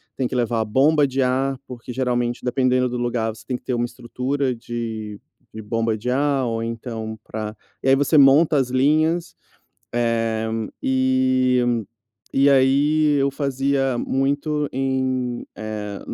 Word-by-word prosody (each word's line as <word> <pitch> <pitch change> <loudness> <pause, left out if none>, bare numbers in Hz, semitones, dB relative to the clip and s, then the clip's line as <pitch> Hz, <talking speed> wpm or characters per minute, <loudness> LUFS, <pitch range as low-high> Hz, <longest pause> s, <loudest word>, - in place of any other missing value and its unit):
tem 130 - -1
que - - -5
levar 120 -2 0
a - - -1
bomba 145 +7 +3
de 135 0 -1
ar. 135 +1 +1
Porque, 125 -1 -8
geralmente, 120 -1 -1
dependendo 125 0 +2
do 125 - -3
lugar, 120 -2 -1
você 110 0 -15
tem 125 0 -2
que - - -26
ter 130 - -2
uma 120 0 0
estrutura 125 +2 -2
de 115 -3 -5 0.3
de 110 - -7
bomba 115 +1 -1
de 115 +4 -4
ar. 135 0 +1
Ou 115 -1 -2
então 115 -1 -5
pra 110 0 -5 0.3
e 135 - +1
aí 135 - +7
você 145 +3 +2
monta 145 +3 +6
as 130 -2 +1
linhas. 155 +6 +1 0.6
Eh, 115 -1 0 0.3
e 130 -3 +2 0.5
e 140 +1 +4
aí 145 +3 +3
eu 140 - +2
fazia 135 -1 0
muito 145 +4 0
em, 130 -2 -1
eh, 105 -2 -5
130 Hz, 150 wpm, -22 LUFS, 115-135 Hz, 0.6 s, aí